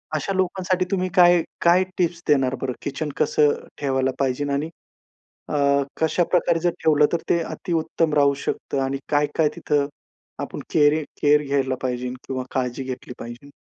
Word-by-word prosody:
अशा 155 +6 -1
लोकांसाठी 185 0 0
तुम्ही 185 -1 0
काय 175 -2 +6 0.2
काय 175 +2 +5
टिप्स 175 -1 0
देणार 135 -3 +3
बरं? 130 -2 -2
किचनच 145 +1 -4
कसं 150 -1 +3 0.3
ठेवायला 130 -2 +1
पाहिजेलं? 140 +1 0
आणि 145 +3 -1 0.8
अ, - - -2 0.4
कशा 160 +2 +2
प्रकारे 170 -2 +2
जर 175 - +2
ठेवलं 150 -2 +5
तर - - +3
ते 170 - +3
अति 175 +2 -5
उत्तम 160 -1 0
राहू 140 -1 +4
शकतं. 140 - -2
आणि 135 +1 -1
काय-काय 150 +1 +2
तिथं 145 -1 0 0.5
आपण - - -5
केयरी 150 0 +4 0.2
केयर 150 0 +5
घ्यायला 135 -2 0
पाहिजेल? 125 -1 -2
किंवा 130 -1 -3
काळजी 130 0 -2
घेतली 130 -1 -6
पाहिजेलं? 120 +4 -9
145 Hz, 160 wpm, -23 LUFS, 135-170 Hz, 0.8 s, काय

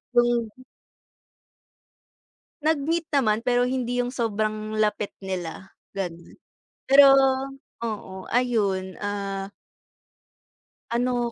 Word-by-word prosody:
yung 240 -1 +3 2.1
Nag-meet 320 +2 +1
naman, 230 -4 +2
pero 245 0 +2
hindi 245 -1 -1
yung 245 - -2
sobrang 215 -3 -2
lapit 210 -1 0
nila, 190 -1 -5 0.2
gano'n. 170 -3 -5 0.6
Pero 275 +1 +9 0.8
oo, 190 -4 -5
ayun, 205 -7 +1
ah 200 -1 -4 1.4
ano 240 0 0
225 Hz, 80 wpm, -25 LUFS, 195-245 Hz, 2.1 s, Pero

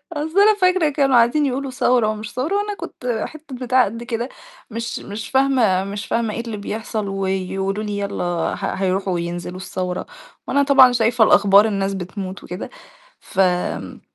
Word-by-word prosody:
أيوه. 295 +1 -2
أصل 335 +5 +1
أنا 425 +1 +6
فاكرة 365 -4 +3
كانوا 275 -2 +2
قاعدين 240 +6 +4
يقولوا 270 0 -2
ثورة 245 -2 +2
ومش 215 0 -4
ثورة 285 +10 -1
وأنا 410 0 -1
كنت 245 - -4
حتّة 310 -3 -10
بتاعة 250 0 +2
قد 230 +4 -6
كده، 240 +1 -3 0.4
مش 230 +1 -4
مش 210 +2 -7
فاهمة 255 -9 +3
مش 205 +2 -5
فاهمة 230 -2 -1
إيه 230 - -3
اللي 230 -2 -6
بيحصل 215 +1 -4
ويقولوا 195 +1 -2
لي: 205 -1 -3
"يلّا 200 -2 -3
ه 175 -2 -1 0.2
هيروحوا 190 0 0
وينزلوا 175 +1 -4
الثورة،" 185 -1 -4 0.4
وأنا 280 - +2
طبعًا 270 -3 +7
شايفة 230 -1 +3
الأخبار 200 -1 +6
الناس 195 -2 -1
بتموت 190 +1 -6
وكده، 180 +1 -6 0.5
ف 195 - -8
آمم، 180 -2 0
220 Hz, 170 wpm, -21 LUFS, 195-260 Hz, 0.5 s, طبعًا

